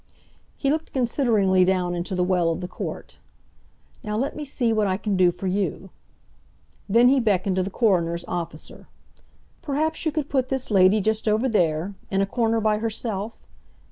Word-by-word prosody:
He 275 - 0
looked 315 +1 -3
consideringly 230 -7 +2
down 180 -1 +1
into 175 +2 -3
the 180 - +1
well 180 -2 +2
of 165 - -2
the 180 - -5
court. - - -7 0.8
"Now 210 -1 -3
let 270 +5 -2
me 300 - -5
see 250 -5 0
what 215 -2 +1
I 185 -1 0
can 205 -1 -2
do 185 -1 +5
for 175 +2 -6
you—" 190 0 -2 1.0
Then 235 +4 +5
he 270 +1 +4
beckoned 195 -4 +1
to - - +3
the 190 - -2
coroner's 175 -6 +1
officer: 165 -3 -6 0.7
"Perhaps 315 +2 -1
you 315 - 0
could 295 -2 -2
put 260 -3 0
this 265 -3 -2
lady 195 +1 +5
just 220 +2 0
over 215 +4 +2
there, 175 -4 0 0.2
in 195 - 0
a 195 - +3
corner 225 +1 0
by 215 -1 +1
herself? 220 -1 -3
210 Hz, 175 wpm, -24 LUFS, 185-240 Hz, 1.0 s, do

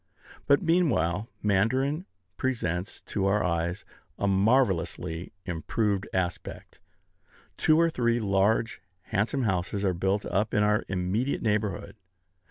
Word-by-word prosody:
But, 140 +5 +4
meanwhile, 115 - +1
Mandarin 130 - +1 0.3
presents 95 -7 -2
to 100 -2 -2
our 105 +2 +2
eyes 85 +2 -1 0.3
a - - -1
marvellously 95 -5 +1
improved 100 +4 -1
aspect. 90 -1 -4 0.8
Two 155 0 +3
or 165 0 +3
three 120 -4 +1
large, 105 +2 +1 0.3
handsome 110 +6 +1
houses 100 0 -1
are 95 - +2
built 95 +4 0
up 105 +3 0
in 105 - +4
our 105 0 +2
immediate 95 +8 -1
neighborhood. 105 -3 -1
105 Hz, 115 wpm, -27 LUFS, 95-120 Hz, 0.8 s, But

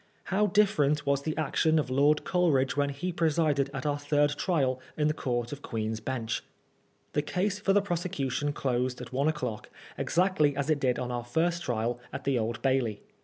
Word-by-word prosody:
How 210 +2 +3
diflEerent 150 -8 +2
was 140 0 +2
the 155 +2 -3
action 155 +1 +2
of 145 -4 0
Lord 145 +3 +3
Coleridge 140 -8 +2
when 140 0 +1
he 150 +6 -3
presided 155 -4 +1
at 140 - -5
our 145 -1 0
third 145 0 +2
trial 140 -6 0 0.2
in 150 -1 +2
the 155 - +2
Court 120 -5 -2
of 145 0 -6
Queen's 110 -3 -3
Bench! 115 -1 -3 0.7
The 150 - +2
case 190 +7 -1
for 205 -2 +1
the 200 0 +4
prosecution 160 -6 -1
closed 125 -2 -1
at - - -9
one 140 +3 +1
o'clock, 125 -8 -3 0.3
exactly 170 -5 +2
as 140 +2 0
it 150 - +2
did 125 -3 +1
on 125 0 -3
our 120 -1 -2
first 165 +8 0
trial 120 -2 -1
at - - -6
the 135 -3 +1
Old 115 +1 -3
Bailey. 130 -6 +1
145 Hz, 190 wpm, -29 LUFS, 130-160 Hz, 0.7 s, the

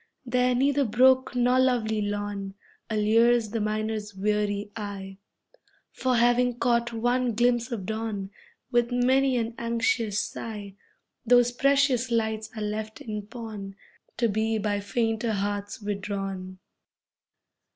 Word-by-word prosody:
There 250 0 +2
neither 280 +2 +2
brook 260 +2 +4
nor 250 +1 +3
lovely 230 -4 +2
lawn 205 -1 -3 0.3
Allures 225 +1 +3
the 225 -1 -1
miner's 215 -1 -2
weary 205 0 -1
eye, 200 -3 -6 0.7
For, 255 -1 0
having 240 +1 +3
caught 235 -1 +1
one 245 +1 0
glimpse 240 +1 +2
of 210 -6 -4
dawn, 215 -2 -4 0.4
With 240 -1 +2
many 260 +1 +3
an 230 0 -2
anxious 230 -2 0
sigh, 210 -3 -5 0.5
Those 245 0 +5
precious 270 -1 +2
lights 220 -2 -1
are 215 - -4
left 215 +1 -4
in 210 -2 -6
pawn 215 -4 -7 0.4
To 235 +1 +2
be 220 +1 0
by 205 -1 -1
fainter 225 +2 -1
hearts 205 0 -3
withdrawn. 195 -2 -4
225 Hz, 120 wpm, -26 LUFS, 205-245 Hz, 0.7 s, Those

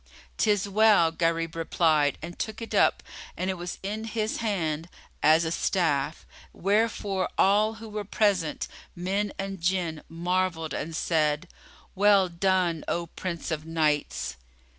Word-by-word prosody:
"'Tis 205 -2 +2
well," 205 -5 +5
Gharib 165 0 0
replied, 160 -3 +2
and 170 +1 -7
took 220 -1 -3
it 230 - -7
up, - - +3 0.3
and 185 +1 -1
it - - -2
was 175 -1 -6
in 215 +3 -3
his 220 0 -2
hand 170 -7 -2 0.3
as 160 +2 +5
a 160 - -1
staff; 160 -5 0 0.3
wherefore 200 -1 0
all 210 +3 +4
who 225 0 -9
were 210 -1 -4
present, 195 -5 0 0.3
men 195 +3 -1
and 195 -2 -5
Jinn, 170 -3 0
marvelled 170 -1 -1
and 160 +2 -4
said, 155 0 +1 0.5
"Well 200 -1 +4
done, 175 -2 +1
O 170 0 -1
Prince 170 0 -5
of 155 0 -3
Knights!" 155 -3 0
180 Hz, 140 wpm, -27 LUFS, 165-200 Hz, 0.5 s, well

